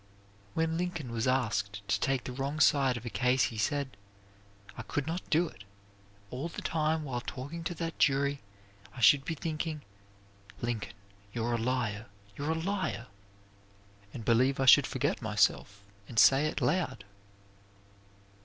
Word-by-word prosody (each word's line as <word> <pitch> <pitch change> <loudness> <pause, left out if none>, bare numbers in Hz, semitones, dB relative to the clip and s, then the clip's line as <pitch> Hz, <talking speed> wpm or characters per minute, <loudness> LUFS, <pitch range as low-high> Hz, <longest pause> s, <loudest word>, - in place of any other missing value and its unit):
When 165 0 0
Lincoln 175 -8 -3
was 115 +1 -1
asked 105 -6 -1
to 100 0 +1
take 135 +1 0
the - - -5
wrong 140 +4 -3
side 135 -4 +4
of 120 - -9
a - - -3
case 125 0 +2
he 115 -2 -2
said, 140 0 -1 0.8
"I - - -6
could 145 - -3
not 165 +4 -4
do 170 +3 +3
it. 100 -9 -13 0.7
All 130 +6 -3
the - - -7
time 160 0 0
while 125 -4 -3
talking 145 +7 -6
to 175 - -2
that 165 0 -5
jury 140 0 +2 0.5
I - - -8
should 135 +4 +6
be 165 - -3
thinking, 155 0 -4 0.8
'Lincoln, 115 -5 -3 0.4
you're 120 0 -1
a 120 - 0
liar, 115 -2 -1 0.3
you're 145 +2 -3
a 160 - +1
liar,' 165 - -2 1.0
and 115 - -7
I - - -10
believe 130 +4 +3
I 135 - +2
should 130 - +8
forget - - -1
myself 100 0 +1 0.2
and 115 - -10
say 135 +6 +6
it - - -3
out - - +3
loud." 140 - -1
135 Hz, 165 wpm, -30 LUFS, 120-155 Hz, 1.0 s, should